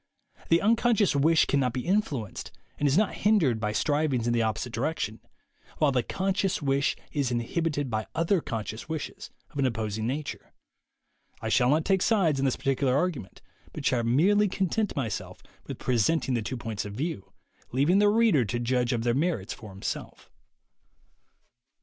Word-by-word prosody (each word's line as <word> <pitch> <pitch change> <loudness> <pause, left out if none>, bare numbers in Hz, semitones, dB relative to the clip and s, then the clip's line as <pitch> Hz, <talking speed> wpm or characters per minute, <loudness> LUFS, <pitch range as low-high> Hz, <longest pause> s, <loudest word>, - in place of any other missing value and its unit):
The 165 +1 +4
unconscious 225 -3 +3
wish 155 +3 +4
cannot 130 -4 +1
be 130 -1 -4
influenced 155 - -1 0.3
and 145 - +2
is 140 +3 +3
not 215 0 +2
hindered 180 - +2
by 105 -1 -1
striv 150 +6 +1
ings 120 -3 0
in 120 - +1
the 120 - +2
opposite 110 +2 -2
direction, 130 -3 -2 0.6
while 150 -2 +3
the 130 -2 +2
conscious 195 - -1
wish 140 -1 +1 0.2
is 140 -4 0
inhibited 145 +5 -1
by 110 -2 -2
other 165 +2 +2
conscious 110 +3 -5
wishes 160 -2 -5 0.2
of 145 - -7
an 135 - +3
opposite 110 -3 -3
nature. 135 +7 -4 0.9
I - - -4
shall 125 - +3
not 155 +3 +2
take 190 -1 +2
sides 175 - +2
on 135 - +1
this 130 - +1
par 135 - 0
ticular 130 -1 +1
argument, 145 - -2 0.3
but - - -6
shall 125 - +2
merely 185 - +3
content 195 +3 -1
myself 120 -6 -4 0.2
with - - -5
presenting 130 +4 +1
the 120 - 0
two 125 +4 -4
points 110 -3 -4
of 105 - -7
view, 135 - -4 0.4
leaving 145 +10 +3
the 205 0 +5
reader 215 - +4
to 115 +2 -2
judge 125 0 0
of 115 -1 -1
their 120 0 +2
merits 145 - -1
for 110 - -11
himself. 95 0 -6
140 Hz, 175 wpm, -27 LUFS, 120-170 Hz, 0.9 s, the